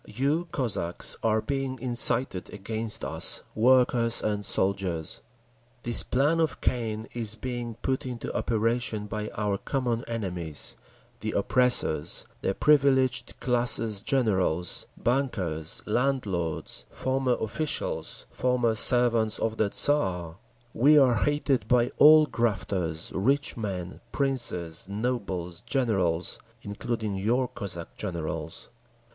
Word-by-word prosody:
You, 145 +9 -1
Cossacks, 95 - -1
are 110 -1 +1
being 135 -2 -2
incited 120 -4 +3
against 110 +2 -2
us, - - +2
workers 120 0 +3
and 105 -1 -1
soldiers. 95 -5 -1 0.6
This 120 -1 +6
plan 145 +6 +1
of 160 -1 0
Cain 110 -2 -2
is 110 -3 -2
being 120 0 -5
put 130 0 -1
into 125 -2 -5
operation 115 -1 0
by 105 +1 -4
our 100 -2 -1
common 125 -4 -2
enemies, 90 -9 -3 0.4
the - - -4
oppressors, 90 -11 +1 0.2
the 95 - -1
privileged 130 -4 +2
classes—generals, 110 - +1
bankers, 95 - -1
landlords, 105 -9 -2
former 130 -1 0
officials, 130 +8 -2
former 125 -2 +1
servants 115 -1 +3
of 110 0 -2
the 105 - +1
Tsar…. 90 - +1 0.4
We 145 +6 +5
are 130 -4 +6
hated 135 -1 0
by 125 +1 +3
all 155 +1 +8
grafters, 95 - -2
rich 135 +9 +1
men, 95 -5 -5
princes, 95 - -2
nobles, 100 -6 -3
generals, 105 -9 0 0.2
including 105 +1 -3
your 120 +6 +1
Cossack 85 -7 -7
generals. 80 -4 -5
115 Hz, 105 wpm, -27 LUFS, 95-125 Hz, 0.6 s, all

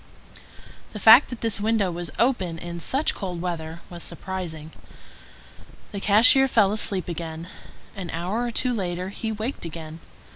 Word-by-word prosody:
The 210 - -6
fact 225 +7 +8
that 245 - -8
this 225 -3 0
window 210 -3 +1
was 170 -1 -4
open 190 -10 +1
in 170 +1 -7
such 270 - +1
cold 180 -4 -5
weather 170 -1 -5
was 175 -1 -9
surprising. 165 -5 -6 1.2
The 200 - -5
cashier 230 +7 +6
fell 215 -6 +3
asleep 195 -5 +1
again. 165 -1 -6 0.5
An 185 -4 -6
hour 180 +8 -2
or 245 - -1
two 250 +2 +1
later 180 -3 -3
he 220 +3 -4
waked 220 +5 -4
again. 160 -1 -8
190 Hz, 150 wpm, -24 LUFS, 170-220 Hz, 1.2 s, fact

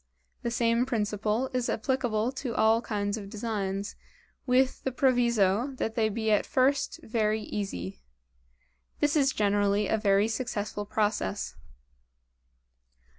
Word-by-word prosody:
The 235 - -1
same 235 +1 +1
principle 215 +1 -1
is 250 -1 0
applicable 235 -1 0
to 260 -3 -5
all 220 +1 +4
kinds 205 -2 -2
of 200 -2 -7
designs, 205 -2 -3 0.5
with 255 +1 +2
the 265 - -1
proviso 240 -2 +2
that 225 - -2
they 225 -1 +1
be 220 +1 -1
at 210 - +4
first 270 +2 +1
very 220 -1 0
easy. 95 - -5 1.0
This 295 +1 +2
is 275 -3 +4
generally 205 -1 +2
a 220 - +1
very 200 0 +3
successful 210 -3 -3
process. 210 -1 -1
220 Hz, 125 wpm, -28 LUFS, 205-245 Hz, 1.0 s, all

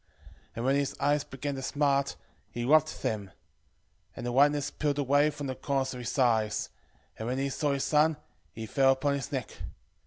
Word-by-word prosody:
11:12 - - -42 0.5
And 115 - -3
when 135 +1 +3
his 140 -1 -1
eyes 145 +1 +2
began 140 +2 -5
to 135 - -5
smart, 140 0 +1 0.3
he 120 0 -4
rubbed 155 +3 +3
them; 105 -2 -1
11:13 - - -20 0.8
And 120 - -6
the 120 - -1
whiteness 145 +2 +3
pilled 145 -2 -1
away 145 +1 +3
from 145 -1 -6
the 130 - -2
corners 135 0 -1
of 125 - -7
his 125 - -4
eyes: 110 -5 +2 0.5
and 110 - -4
when 125 +2 -1
he 135 +1 0
saw 145 +1 0
his 140 - -1
son, 155 0 +3 0.3
he 110 +6 -7
fell 135 +4 +4
upon 140 +2 0
his 140 +1 -4
neck. 130 -5 -4
135 Hz, 205 wpm, -29 LUFS, 125-145 Hz, 0.8 s, fell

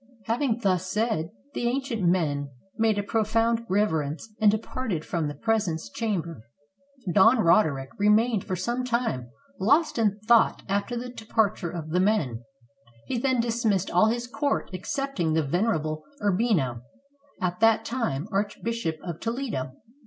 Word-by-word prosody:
Having 235 +1 0
thus 185 -1 +1
said, 210 -4 0 0.2
the 240 - -1
ancient 255 -3 -1
men 155 -6 +1 0.3
made 220 -1 +2
a 205 - 0
profound 225 +2 +1
reverence 160 -3 0
and 215 - +7
departed 215 - -2
from 165 -3 -1
the 145 - -5
presence 205 - -1
chamber. 170 - -3 0.7
Don 225 +5 +6
Roderick 160 - +3
remained 210 +1 +3
for 185 - -3
some 240 +8 -2
time 235 - -1 0.3
lost 285 - +3
in 210 -3 +2
thought 235 -1 +4
after 205 +5 -1
the 245 +1 -5
departure 220 -6 0
of 160 -2 -6
the 180 - +2
men; 170 - +1 0.6
he 250 - -2
then 260 0 +1
dismissed 225 -5 0
all 180 +5 +5
his 240 +2 -1
court 275 0 -1
excepting 190 - -2
the 160 0 +2
venerable 155 -2 0 0.2
Urbino, 190 - +1 0.6
at 180 -1 -2
that 225 0 +4
time 220 - -2
Archbishop 205 -2 -2
of 170 -3 -5
Toledo. 225 - -3
210 Hz, 140 wpm, -26 LUFS, 170-230 Hz, 0.7 s, and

